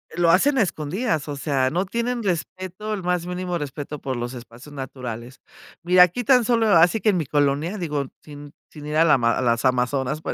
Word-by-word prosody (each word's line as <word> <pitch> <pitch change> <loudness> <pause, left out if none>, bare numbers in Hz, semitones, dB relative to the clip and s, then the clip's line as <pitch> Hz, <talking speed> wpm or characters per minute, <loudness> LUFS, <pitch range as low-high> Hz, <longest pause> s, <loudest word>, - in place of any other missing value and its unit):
lo 175 -1 +2
hacen 260 +11 +4
a - - +5
escondidas, 160 - -2
o 145 - -4
sea, 135 -2 0
no 180 +3 -1
tienen 235 +2 -2
respeto, 185 +2 -4
el 200 - -4
más 180 -1 -1
mínimo 180 0 -3
respeto 145 0 -6
por 130 -2 -4
los 120 +2 -5
espacios 120 +4 -12
naturales. 125 -2 -7 0.4
Mira, 180 +1 +6
aquí 180 +8 0
tan 250 -1 +4
solo, 230 -2 +2
así 175 +4 +4
que 215 - +3
en 190 - +2
mi 160 - -1
colonia, 145 +7 0
digo, 150 -5 -2 0.2
sin 145 -1 -12 0.2
sin 150 -1 -10
ir 150 - -3
a 165 +2 +5
la 155 - +5
a 115 -2 +1
las 115 -1 +1
Amazonas, 130 +3 0
por - - -4
155 Hz, 210 wpm, -23 LUFS, 135-185 Hz, 0.4 s, Mira